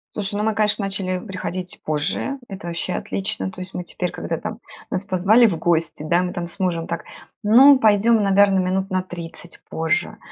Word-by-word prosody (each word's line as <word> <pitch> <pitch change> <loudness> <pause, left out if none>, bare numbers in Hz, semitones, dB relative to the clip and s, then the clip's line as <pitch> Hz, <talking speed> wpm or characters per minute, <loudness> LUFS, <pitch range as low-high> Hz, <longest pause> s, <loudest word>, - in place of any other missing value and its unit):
Слушай, 205 0 -3
ну, 210 - -1
мы, 220 0 +1
конечно, 210 -1 +1
начали 190 -1 -2
приходить 185 -2 -4
позже 155 - -1
это 190 -3 -8
вообще 170 +2 -3
отлично. 195 -1 -3
То 185 - -9
есть 185 +1 -7
мы 180 - -4
теперь, 180 +1 -3
когда - - -4
там - - -6 0.3
нас 185 - -2
позвали 205 +6 +4
в 170 -5 -1
гости, 165 -3 0
да, 170 +3 +2
мы 180 0 -3
там 175 -2 -4
с 185 - -7
мужем 170 -3 -1
так: 170 - -4 0.4
"ну, 255 +6 +7
пойдем, 220 0 +4
наверное, 195 -1 +4
минут 190 +2 -1
на 185 0 +1
30 175 -1 -10
позже 165 +3 -1
185 Hz, 190 wpm, -21 LUFS, 175-205 Hz, 0.4 s, ну